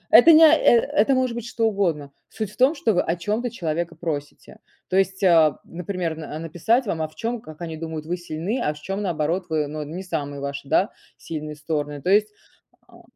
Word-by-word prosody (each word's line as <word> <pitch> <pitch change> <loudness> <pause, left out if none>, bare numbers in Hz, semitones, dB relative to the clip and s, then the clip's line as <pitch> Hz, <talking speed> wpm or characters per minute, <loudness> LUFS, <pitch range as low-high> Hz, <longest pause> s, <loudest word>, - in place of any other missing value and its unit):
Это 245 +9 +9
не 320 0 +8
о 315 - +8
э 320 - +5
это 225 +4 +2
может 255 -2 0
быть 235 0 -5
что 230 -1 -1
угодно. 170 -9 -1 0.2
Суть 215 -3 -5
в - - -18
том, 265 +5 +4
что 230 -7 +1
вы 180 - +3
о 165 - -1
чём-то 210 +8 -2
человека 170 -5 -3
просите. 155 -3 -6 0.3
То - - -2
есть, 195 0 +1
а, 165 -5 +5
например, 175 0 -4
а, 155 -1 -7
н 155 - -5
написать 220 - +1
вам, 165 -5 -2
а 155 - -1
в 155 - -22
чём, 230 0 -3
как 155 -1 -12
они 165 -2 -5
думают, 160 -1 -6
вы 175 +3 -2
сильны, 175 +7 -3
а 150 - 0
в - - -12
чём, 195 +6 -4
наоборот, 175 -1 -1
вы, 155 -2 0
ну, 155 +1 -5
э, 150 - -5
не 170 +6 -6
самые 145 -6 -4
ваши, 140 0 -5
да, 195 - +3 0.3
сильные 155 -2 -6
стороны. 150 -1 -3
То 185 - 0
есть, 210 +1 +4 0.6
а - - -17
170 Hz, 230 wpm, -23 LUFS, 155-210 Hz, 0.6 s, Это